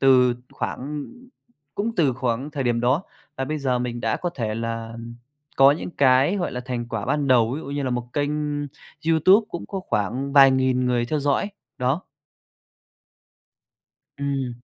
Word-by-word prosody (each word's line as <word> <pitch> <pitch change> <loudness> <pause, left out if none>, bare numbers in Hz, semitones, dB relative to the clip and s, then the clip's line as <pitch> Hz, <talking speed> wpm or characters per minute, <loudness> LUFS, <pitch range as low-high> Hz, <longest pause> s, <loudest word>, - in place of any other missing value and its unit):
từ 125 -2 +5 0.2
khoảng 145 +2 -4 0.7
cũng 225 +3 -1
từ 145 -7 +3
khoảng 130 +2 -2
thời 145 -3 -3
điểm 120 -1 +1
đó, 130 +8 +2 0.3
và 135 - -1
bây 155 +2 -3
giờ 130 -3 0
mình 120 -1 -3
đã - - 0
có 175 - -3
thể 110 -8 -3
là 115 0 -4 0.6
có 135 +1 +8
những 160 - -5
cái 135 +6 +4
gọi 180 - -2
là 125 - -3
thành 120 -2 -4
quả 115 -4 -3
ban 145 -2 0
đầu, 120 -2 +4
ví - - -5
dụ - - -9
như 140 0 -3
là 130 - -1
một 120 0 -3
kênh 145 0 0 0.8
YouTube 185 +7 +5
cũng 170 - -5
có 195 -2 -4
phản 125 +7 -1
vài 135 -2 +8
nghìn 130 -1 +2
người 120 -1 +1
theo 150 +4 -1
dõi 145 +8 +1 0.3
đó. 130 +8 0 2.2
Ừm. 135 -4 -3
130 Hz, 170 wpm, -23 LUFS, 120-145 Hz, 2.2 s, có